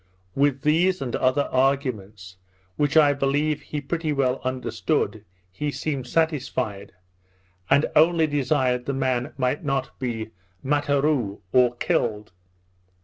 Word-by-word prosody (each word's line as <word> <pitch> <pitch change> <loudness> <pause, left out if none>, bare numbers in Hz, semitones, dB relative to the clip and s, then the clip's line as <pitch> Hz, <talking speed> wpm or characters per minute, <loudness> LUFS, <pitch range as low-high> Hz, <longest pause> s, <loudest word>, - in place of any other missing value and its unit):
With 140 0 +1
these 175 +5 +2
and 130 -3 -3
other 130 +2 +1
arguments, 110 -9 -1 0.4
which 145 +4 +1
I 145 -2 +6
believe 145 +2 0
he 150 +1 -5
pretty 155 +2 -2
well 135 -3 0
understood, 130 -4 -2 0.3
he 145 +11 -3
seemed 140 -3 -3
satisfied, 130 -10 -1 0.8
and 145 - +4
only 165 +1 +5
desired 130 -4 0
the 140 - 0
man 130 0 -1
might 130 +4 -1
not 135 -3 -2
be 115 -4 -4 0.3
Matterou 145 -6 0
(or 125 -1 +4
killed). 105 -3 -1
135 Hz, 120 wpm, -24 LUFS, 125-150 Hz, 0.8 s, I